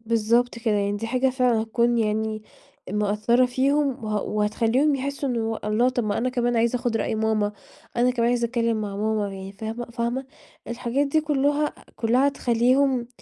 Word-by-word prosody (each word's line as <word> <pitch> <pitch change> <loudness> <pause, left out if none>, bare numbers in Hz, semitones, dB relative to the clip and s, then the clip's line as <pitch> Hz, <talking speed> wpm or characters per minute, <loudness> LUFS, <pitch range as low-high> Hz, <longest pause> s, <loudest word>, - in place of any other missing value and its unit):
بالضبط 230 +2 +1
كده 225 -2 0
يعني، 205 0 0
دي 225 +2 -4
حاجة 255 +2 +1
فعلًا 250 -4 +2
هتكون 235 +1 +1
يعني 215 0 -1 0.5
مأثرة 210 +4 +2
فيهم، 270 0 0
وه 210 -1 -1
وهتخليهم 225 +7 +1
يحسوا 280 +1 -3
إنه 225 -2 -1
الله 215 +4 +2
طب 245 -3 -1
ما 205 - -1
أنا 255 +2 0
كمان 245 -1 0
عايز 235 +2 +2
آخد 240 -2 0
رأي 220 - -1
ماما، 215 -1 0 0.4
أنا 245 +1 +3
كمان 235 -1 +1
عايز 240 -1 +1
أتكلم 230 -2 0
مع 200 -1 -4
ماما، 215 -1 0
يعني 195 0 -8
فاهمة 220 +4 -5
فاهمة؟ 235 +3 -2 0.4
الحاجات 250 +4 -1
دي 310 +3 +2
كلها 295 0 0 0.2
كلها 250 +5 +3
تخليهم 250 0 +1
235 Hz, 170 wpm, -24 LUFS, 220-255 Hz, 0.5 s, أنا